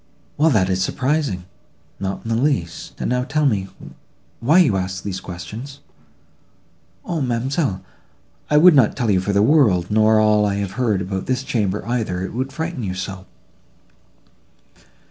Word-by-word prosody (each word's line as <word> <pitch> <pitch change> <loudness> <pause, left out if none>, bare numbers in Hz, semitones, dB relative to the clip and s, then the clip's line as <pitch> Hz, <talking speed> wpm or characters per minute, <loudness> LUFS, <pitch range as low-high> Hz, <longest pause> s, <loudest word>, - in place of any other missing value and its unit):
—"Well, 155 +2 +3
that 105 -10 +2
is 95 0 0
surprising!"—"Not 100 - -4
in - - -4
the 115 +1 +1
least: 130 - -2
and - - -2
now 125 0 +1
tell 150 +3 0
me, 100 -8 +1 0.7
why 145 +9 +3
you 155 - +4
ask 95 -1 -3
these 95 -2 -4
questions." 105 +12 -8 1.3
"O, 165 -3 -2
ma'amselle! 130 - -1 0.7
I 150 - +4
would 175 +3 +8
not 130 -7 +4
tell 115 -3 +1
you 95 -2 +2
for 100 - -1
the 100 0 +3
world, 110 - +3
nor 110 0 +4
all 105 -1 +4
I 100 -1 0
have 100 -2 -3
heard 110 -3 0
about 95 0 -4
this 130 0 -1
chamber, 105 -6 -1
either; 110 -7 -2
it 95 - -5
would 130 +3 -3
frighten 160 0 -4
you 95 -4 -3
so." 95 0 -6
110 Hz, 160 wpm, -20 LUFS, 95-135 Hz, 1.3 s, would